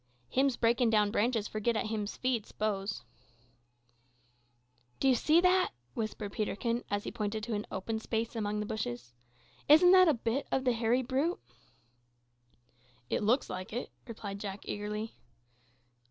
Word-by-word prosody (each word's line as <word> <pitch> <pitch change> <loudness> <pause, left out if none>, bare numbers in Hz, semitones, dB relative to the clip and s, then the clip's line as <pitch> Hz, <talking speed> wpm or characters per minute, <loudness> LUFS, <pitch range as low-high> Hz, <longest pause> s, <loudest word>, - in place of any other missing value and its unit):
"Him's 265 -1 +2
breakin' 235 +1 +3
down 210 -2 +3
branches 225 -1 +1
for 215 - -4
git 235 +2 +1
at 215 - 0
him's 215 -1 -3
feed, 250 -4 -1
s'pose." 205 -1 -2 2.0
"Do 270 - +2
you 265 - +6
see 310 +6 +4
that?" 365 0 +3 0.2
whispered 215 -2 -4
Peterkin, 230 +3 -1
as 205 0 -1
he - - -5
pointed 215 -2 -3
to 235 0 -3
an 210 0 -3
open 220 +4 -3
space 225 +1 -2
among 210 -1 -1
the - - -3
bushes. 120 - -4 0.6
"Isn't 320 +4 +8
that 370 -1 +8
a 310 - +4
bit 235 +4 -2
o' - - +3
the 260 -2 +1
hairy 235 +2 +1
brute?" 275 +8 0 1.7
"It - - +1
looks 230 +6 +2
like 185 +3 -6
it," 245 - -4 0.2
replied 205 -4 -6
Jack 200 -1 -5
eagerly. 210 +2 -4
225 Hz, 155 wpm, -31 LUFS, 210-250 Hz, 2.0 s, Isn't